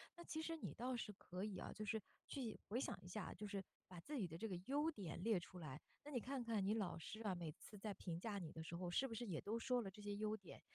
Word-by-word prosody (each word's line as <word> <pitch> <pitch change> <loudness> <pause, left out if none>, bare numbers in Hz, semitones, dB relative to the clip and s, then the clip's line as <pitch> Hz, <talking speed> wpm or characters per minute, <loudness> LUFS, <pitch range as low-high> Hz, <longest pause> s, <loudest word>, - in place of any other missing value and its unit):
那 345 - -6
其 315 -2 0
实 330 0 0
你 - - -2
倒 250 +2 +1
是 210 -2 -1
可 185 -1 -3
以 205 -3 0
啊， - - -2
就 215 - -2
是 220 +1 +2 0.3
去 250 -6 -1
回 230 +5 +3
想 - - +1
一 - - -8
下， 185 +2 -1
就 210 - -3
是 200 -2 0 0.2
把 180 -2 -6
自 295 - -1
己 200 -7 +3
的 165 - -5
这 200 +7 0
个 190 - 0
优 290 +4 +5
点 180 - -2
列 220 -4 +6
出 180 +1 -7
来。 150 -4 -3 0.2
那 295 - -5
你 255 - +3
看 260 +2 0
看 225 -4 +3
你 205 - +6
老 190 -6 +2
师 215 +7 -4
啊， 205 -4 +3
每 170 -3 -1
次 210 - -9
在 205 +1 -1
评 170 -3 -1
价 205 +1 0
你 165 -4 -3
的 160 - -3
时 165 +1 -3
候 175 +1 0
是 260 +10 +5
不 235 - -3
是 230 +1 -1
也 170 -6 +1
都 225 +3 +1
说 250 +1 +4
了 195 - -2
这 210 - -9
些 205 0 0
优 215 +1 +3
点。 195 -5 -8
210 Hz, 320 characters per minute, -46 LUFS, 180-235 Hz, 0.3 s, 列